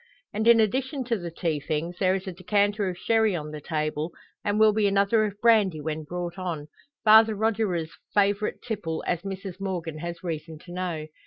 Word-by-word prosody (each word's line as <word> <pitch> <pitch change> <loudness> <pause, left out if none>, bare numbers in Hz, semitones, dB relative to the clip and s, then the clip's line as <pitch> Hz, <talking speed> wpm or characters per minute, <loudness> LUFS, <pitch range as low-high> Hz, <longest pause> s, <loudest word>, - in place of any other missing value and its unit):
And 220 +2 0
in 235 -1 +8
addition 260 +5 0
to 235 -2 0
the 175 -1 -5
tea 165 -2 -2
things, 155 +4 -3
there 185 -1 +3
is 190 - -4
a 190 - -4
decanter 205 +2 +1
of 180 - -5
sherry 220 0 +2
on 150 -2 -5
the 150 -1 -7
table, 155 +1 -2 0.3
and 205 +1 0
will 215 -1 +6
be 210 -1 +2
another 200 +2 +3
of 205 -1 -5
brandy 210 -8 +4
when 155 +1 -4
brought 175 +2 -5
on 165 -5 -4 0.3
Father 220 0 +7
Rogier's 200 -6 0 0.2
favourite 205 +1 +1
tipple, 180 -9 -3
as 175 -2 0
Mrs 195 -1 -6
Morgan 170 -5 -3
has 170 +1 -6
reason 160 -2 -5
to 175 - -11
know. 175 -4 -3
185 Hz, 190 wpm, -26 LUFS, 165-210 Hz, 0.3 s, in